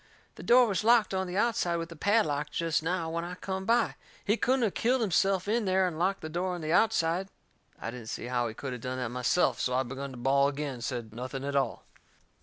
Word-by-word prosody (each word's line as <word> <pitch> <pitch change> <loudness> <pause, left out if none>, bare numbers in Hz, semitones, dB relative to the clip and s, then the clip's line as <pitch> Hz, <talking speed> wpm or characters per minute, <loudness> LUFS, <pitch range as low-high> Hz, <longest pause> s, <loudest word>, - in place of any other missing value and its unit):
"The - - -11
door 250 +1 +6
was 200 -4 -1
locked 230 -3 +4
on 190 0 -1
the 180 +1 -4
outside 210 -6 +1
with 165 0 -5
a - - -8
padlock 155 -6 +1
jest 165 0 0
now 165 0 -2
when 170 +1 -2
I 175 +1 -6
come 190 +1 -4
by. 230 +3 +2 0.3
He 210 - +3
couldn't 255 +2 +1
of 215 - +1
killed 250 +2 +1
himself 195 -1 +2
in 225 +1 +1
there 190 0 +3
and 160 -3 -5
locked 190 +3 0
the 155 - -5
door 180 +3 -2
on 175 - -7
the 155 +1 -1
outside." 185 -3 +2 0.5
I 115 - -4
didn't 120 -2 -9
see - - -5
how 120 -1 0
he 110 - -7
could 135 +1 -5
of 125 - -7
done 130 +1 -4
that 125 -3 -2
myself, 125 +8 +1
so 125 - 0
I 130 - +2
begun 135 +2 -6
to 130 - -10
bawl 140 +3 +3
agin 145 0 -4
and 120 -2 -8
said 120 -5 -4
nothing 130 +3 -5
at 140 0 -3
all. 135 -5 0
165 Hz, 245 wpm, -29 LUFS, 135-195 Hz, 0.5 s, door